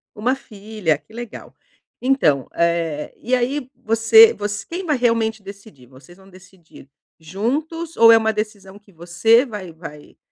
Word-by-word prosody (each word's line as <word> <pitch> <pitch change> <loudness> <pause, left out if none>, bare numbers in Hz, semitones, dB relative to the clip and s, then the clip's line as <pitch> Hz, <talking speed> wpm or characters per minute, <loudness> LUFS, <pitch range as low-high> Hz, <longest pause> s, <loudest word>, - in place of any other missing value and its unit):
1 240 +5 0
filha 210 - -3
que 150 +8 -24
legal, 240 -1 -10 0.5
então, 245 - +1
eh, 170 -3 -1
e 250 - -4
aí, 255 +2 -1
você 225 - +6
voc 205 0 -4 0.2
quem 365 +3 -5
vai 300 -4 0
realmente 230 -3 0
decidir 200 - -14
ou 130 - -16
vocês 175 +6 -18
vão 190 0 -19
decidir 180 -6 -18 0.3
juntos 295 - -4
ou 230 0 +7
é 225 - +7
uma 220 0 0
decisão 205 -2 -6
que 205 -1 -23
você 180 - +2
vai 205 -8 -8
vai, 155 -2 -12
210 Hz, 155 wpm, -20 LUFS, 175-240 Hz, 0.5 s, ou